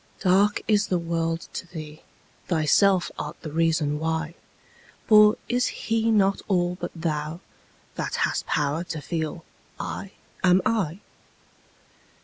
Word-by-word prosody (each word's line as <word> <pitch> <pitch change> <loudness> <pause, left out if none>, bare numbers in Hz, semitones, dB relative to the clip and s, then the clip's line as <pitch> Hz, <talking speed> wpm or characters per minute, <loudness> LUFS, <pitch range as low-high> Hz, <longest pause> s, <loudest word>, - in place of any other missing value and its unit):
Dark 195 +2 +3
is 210 -1 +3
the 180 - +1
world 165 -1 -2
to 185 - -5
thee: 155 -3 -9 0.5
thyself 180 +3 +3
art - - -6
the 155 - -6
reason 160 -2 +1
why; 160 0 -2 0.7
For 210 -1 +7
is 245 +1 +1
He 225 0 -1
not 200 -3 +3
all 180 -3 +1
but - - -2
thou, 155 0 -3 0.5
that - - -3
hast - - -3
power 150 +3 0
to 165 -2 -5
feel 160 +1 -4 0.3
'I 200 - -5 0.3
am 180 0 +5
I'? 195 -5 0
170 Hz, 130 wpm, -25 LUFS, 160-195 Hz, 0.7 s, For